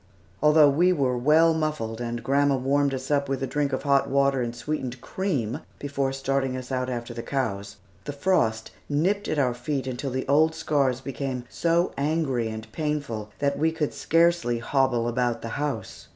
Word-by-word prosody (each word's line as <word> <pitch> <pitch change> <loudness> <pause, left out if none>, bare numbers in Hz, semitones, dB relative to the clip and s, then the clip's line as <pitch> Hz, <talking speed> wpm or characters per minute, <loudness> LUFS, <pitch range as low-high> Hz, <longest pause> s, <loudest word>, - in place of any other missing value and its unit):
Although 150 -1 +6
we 175 +6 +3
were 135 -7 +1
well 155 +6 +4
muffled, 150 -8 -2
and 120 0 -4
grandma 140 +1 +3
warmed 140 +2 +1
us 130 +1 -4
up 140 -1 +1
with 135 0 -1
a - - +2
drink 145 +1 -1
of 130 - -2
hot 140 -1 +2
water 140 -1 +2
and 120 -1 -3
sweetened 130 0 -4
cream 140 - -2 0.2
before 140 -1 -2
starting 135 -1 -1
us 130 +1 -8
out 130 0 -1
after 120 -1 -4
the 115 - -5
cows, 100 -7 -3 0.3
the 145 - -3
frost 140 -8 0 0.2
nipped 185 +8 +1
at - - -1
our 130 -4 +2
feet 130 +3 -3
until 130 +1 -3
the 130 +1 -3
old 155 +3 +4
scars 140 -5 0
became 135 -2 -4
so 170 +1 +1
angry 140 -5 0
and 110 0 -7
painful 140 -8 -3
that 140 0 0
we 160 +2 +2
could 160 -2 -2
scarcely 165 -7 +2
hobble 120 -1 +1
about 120 0 -1
the 115 - -4
house. 135 -6 -4
135 Hz, 180 wpm, -25 LUFS, 125-150 Hz, 0.3 s, Although